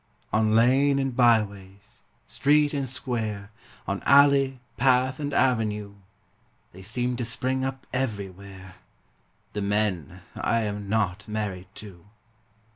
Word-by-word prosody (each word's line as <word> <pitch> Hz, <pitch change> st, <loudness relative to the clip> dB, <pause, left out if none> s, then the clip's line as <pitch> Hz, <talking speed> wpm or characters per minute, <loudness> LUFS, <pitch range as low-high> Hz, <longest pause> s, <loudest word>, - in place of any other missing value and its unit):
On 110 Hz, 0 st, +2 dB
lane 135 Hz, +5 st, +4 dB
and 135 Hz, -2 st, -1 dB
byways, 100 Hz, -5 st, 0 dB, 0.2 s
street 150 Hz, +1 st, +2 dB
and 140 Hz, -3 st, -2 dB
square, 110 Hz, -5 st, -4 dB, 0.4 s
On 100 Hz, 0 st, -2 dB
alley, 140 Hz, -2 st, +4 dB, 0.2 s
path 130 Hz, 0 st, +2 dB
and 145 Hz, -1 st, -3 dB
avenue, 110 Hz, -7 st, 0 dB, 0.8 s
They 95 Hz, -, -13 dB
seem 125 Hz, +5 st, -2 dB
to 120 Hz, -, -2 dB
spring 130 Hz, +3 st, -1 dB
up 135 Hz, 0 st, -4 dB
everywhere 100 Hz, -6 st, -5 dB, 0.8 s
The 105 Hz, -, -3 dB
men 100 Hz, -5 st, -1 dB
I 115 Hz, -, 0 dB
am 105 Hz, -2 st, -4 dB
not 100 Hz, -3 st, -1 dB
married 105 Hz, -4 st, -4 dB
to. 95 Hz, -5 st, -12 dB
110 Hz, 120 wpm, -26 LUFS, 100-130 Hz, 0.8 s, lane